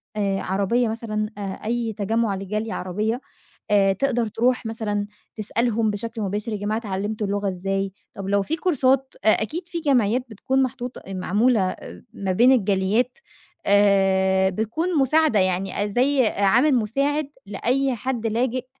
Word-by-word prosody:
آآ، 200 -2 0
عربية 200 +6 +1
مثلًا، 215 -1 -3
آآ، - - -6 0.2
أي 230 0 -1
تجمع 215 +1 0
لجالية 210 +3 -3
عربية 215 +7 -2 0.5
آآ، 195 -2 +4
تقدر 240 +2 0
تروح 245 +3 0
مثلًا 210 -2 -2 0.3
تسألهم 225 +1 0
بشكل 225 +2 -4
مباشر: 210 +3 -2
يا - - -2
جماعة 205 +2 -1
اتعلمتوا 210 0 -3
اللغة 200 0 -1
إزاي؟ 195 +1 -2 0.2
طب 195 -1 -6
لو 200 0 +3
فيه 320 +11 -2
كورسات 270 -6 +1
أ - - +3
أكيد 335 +11 -4
فيه 340 -2 -4
جمعيات 250 -5 +2
بتكون 265 +5 0
محطوطة 250 0 -5
معمولة 200 +2 +1 0.4
ما 195 -3 -2
بين 240 +8 +5
الجاليات 215 +2 +1 0.5
آآ، 190 -1 +4
بتكون 270 - -1
مساعدة 295 -3 +3
يعني 190 +2 0
زي 260 0 +3
عامل 235 +9 +3
مساعد 275 +6 0 0.2
لأي 255 +6 0
حد 235 0 -2
لاجئ 245 +3 -1
220 Hz, 140 wpm, -23 LUFS, 200-250 Hz, 0.5 s, بين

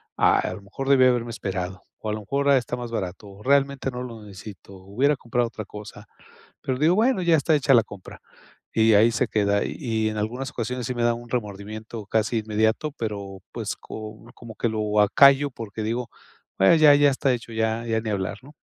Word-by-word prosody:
"A - - +3
lo - - -9
mejor 135 +8 -6
debí 130 -2 +6
haberme 120 -2 +1
esperado, 95 -4 -4 0.2
o 110 - -5
a - - -1
lo 110 - -3
mejor 140 +7 -1
está 125 -2 +2
más 120 -1 -7
barato, 95 -2 -5
o 100 +1 -14
realmente 140 -1 +2
no 125 0 -5
lo 115 -3 -8
necesito, 100 -1 -11
hubiera 120 +11 0
comprado 120 -1 -1
otra 110 -2 -8
cosa". 105 0 -10 0.6
Pero 130 0 -2
digo: 165 +4 +4
"Bueno, 225 -2 +2
ya 170 -1 +4
está 155 +2 +2
hecha 140 -1 +3
la 115 -3 +6
compra", 100 -3 -12 0.5
y 110 -1 +4
ahí 110 +3 +5
se 110 - 0
queda. 100 -1 +1
Y - - -5 0.3
y - - +1
en 110 - -5
algunas 125 +6 -3
ocasiones 125 -1 -4
sí 125 - -3
me 120 - -1
da 120 - +3
un 120 0 -11
remordimiento 110 -1 -5
casi 110 +1 0
inmediato, 110 +7 0
pero 100 -5 -5
pues, - - -4
co 110 0 -9
como 115 -2 -11
que 120 - -1
lo 105 -1 0
acallo 140 +6 +5
porque 110 -2 -7
digo: 115 +1 -2 0.5
"Me 95 +12 +6
ya 150 -2 +8
ya 145 0 +5
está 135 0 +1
hecho, 115 -1 -6
ya 110 +1 -1
ya 110 -1 0
ni 110 - -4
hablar", 100 0 -2
¿no? 145 - -14
115 Hz, 210 wpm, -24 LUFS, 105-130 Hz, 0.6 s, ya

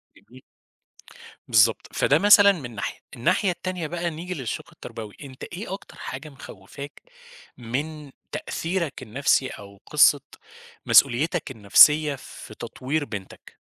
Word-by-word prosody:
جميل. 130 +1 -18 1.1
بالضبط، 110 -1 +3
فده 145 +2 +3
مثلًا 200 0 +7
من 135 - -7
ناحية. 100 - -5 0.2
الناحية 155 - +1
التانية 180 -2 -4
بقى 170 +1 -3
نيجي 170 +3 -6
للشق 130 -8 -5
التربوي، 110 -2 -9
أنت 130 -2 -11
إيه 190 +2 -7
أكتر 195 - -10
حاجة 135 +4 -7
مخوّفاك 140 +1 -11 0.6
من 140 +5 -5 0.2
تأثيرك 165 -6 -3
النفْسي، 130 +2 +1
أو 100 0 -11
قصّة - - +5 0.6
مسؤوليتك 140 +4 +3
النفسيّة 145 +7 +5
في 130 - -12
تطوير 145 +4 -3
بنتك؟ 100 -7 -10
140 Hz, 120 wpm, -24 LUFS, 120-165 Hz, 1.1 s, مثلًا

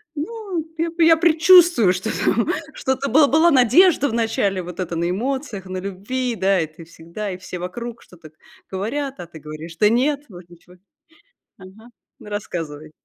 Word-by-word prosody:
Ну 365 0 -5
я 330 +1 0
п 335 0 +1
я 325 - +7
предчувствую, 325 - +5
что 190 +4 -4
там 235 - +1 0.3
что-то, 265 +1 -2
был 285 +3 +5
была 320 +3 +4
надежда 285 - +4
вначале 225 -5 -1
вот 180 +1 -9
эта 175 -2 -4
на 170 +1 -1
эмоциях, 235 +1 -3
на 185 0 -5
любви. 210 +7 -3
Да, 190 -1 +2
и 160 - -1
ты 155 +2 -14
всегда, 170 +5 -7
и 180 - -6
все 185 -1 -8
вокруг 235 +7 -7
что-то 165 -3 -16 0.4
говорят, 260 +8 -4
а 175 - -7
ты 165 -1 -13
говоришь: 155 +2 -9
"Да 210 - +5
нет! 275 +6 +1
Вроде 175 -3 -13
ничего", 175 +1 -18 0.8
ага. 195 +5 -15 0.3
Ну - - -12
рассказывай! 160 -7 -6
215 Hz, 170 wpm, -21 LUFS, 180-280 Hz, 0.8 s, я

